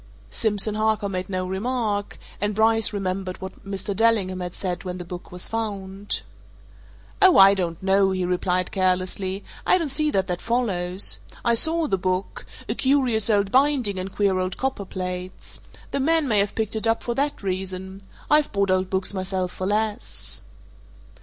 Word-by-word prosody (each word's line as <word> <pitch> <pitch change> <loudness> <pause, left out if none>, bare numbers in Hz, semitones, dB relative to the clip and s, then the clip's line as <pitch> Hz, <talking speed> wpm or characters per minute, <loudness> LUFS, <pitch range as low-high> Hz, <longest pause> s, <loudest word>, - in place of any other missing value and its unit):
Simpson 210 - +1
Harker 215 -1 +1
made 185 -1 -4
no 185 -1 -1
remark, 205 +1 -2 0.2
and 205 0 0
Bryce 225 0 +3
remembered 190 -2 -3
what 190 +2 -9
Mr. 195 0 -4
Dellingham 205 -4 +2
had 180 -1 -5
said 180 -2 -3
when 180 -1 -4
the 175 - -7
book 175 +1 -8
was 180 0 -2
found. 205 -3 -3 1.0
"Oh, 375 -3 +7
I 195 +1 +9
don't 175 -3 -2
know!" 195 0 +4
he 185 -1 -1
replied 180 0 0
carelessly. 185 +1 0 0.2
"I - - +4
don't 330 -5 -2
see 305 +3 +2
that 195 -9 +1
that 180 -2 -3
follows. 195 -6 +1 0.3
I 235 - +4
saw 320 +7 +2
the 195 -10 0
book 185 +1 -2 0.2
a - - 0
curious 255 -6 +3
old 200 -2 +2
binding 260 -8 +2
and 190 +1 -5
queer 195 -2 +1
old 185 0 -2
copper 265 -7 -2
plates. 180 0 -5 0.3
The - - -1
man 320 +2 +3
may 215 -4 +3
have 200 0 +1
picked 220 -1 -2
it 220 +1 0
up 225 0 +1
for 240 - -1
that 280 -2 -1
reason 190 0 -4 0.3
I've 300 0 +3
bought 200 -1 +1
old 185 0 +1
books 190 +1 0
myself 185 -1 -1
for 185 - -4
less." 215 +2 -1
195 Hz, 170 wpm, -24 LUFS, 185-225 Hz, 1.0 s, I